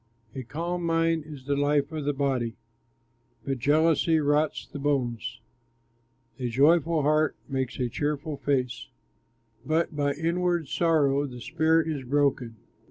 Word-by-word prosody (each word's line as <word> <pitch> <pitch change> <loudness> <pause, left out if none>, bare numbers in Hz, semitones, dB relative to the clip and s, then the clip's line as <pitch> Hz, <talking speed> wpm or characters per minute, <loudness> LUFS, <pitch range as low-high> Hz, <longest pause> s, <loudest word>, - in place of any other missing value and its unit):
A 130 - -5
calm 170 +8 -4
mind 165 -1 +1
is 145 -4 -10
the 140 0 0
life 145 +1 +1
of 155 -2 -4
the 145 - +2
body, 130 -5 -1 0.9
But 135 -2 -2
jealousy 160 +4 +3
rots 150 +1 +1
the 145 - -9
bones. 120 -5 -1 1.0
A 125 -1 -2
joyful 155 +5 +3
heart 155 +1 +2
makes 130 -3 -3
a 125 - +1
cheerful 145 +4 -3
face, 125 -5 -1 0.8
But 155 +3 0
by 145 -1 +1
inward 170 0 -1
sorrow 145 -4 +2
the 125 -2 -9
spirit 160 +5 +1
is 150 -4 -3
broken. 130 -3 0
145 Hz, 135 wpm, -27 LUFS, 135-160 Hz, 1.0 s, jealousy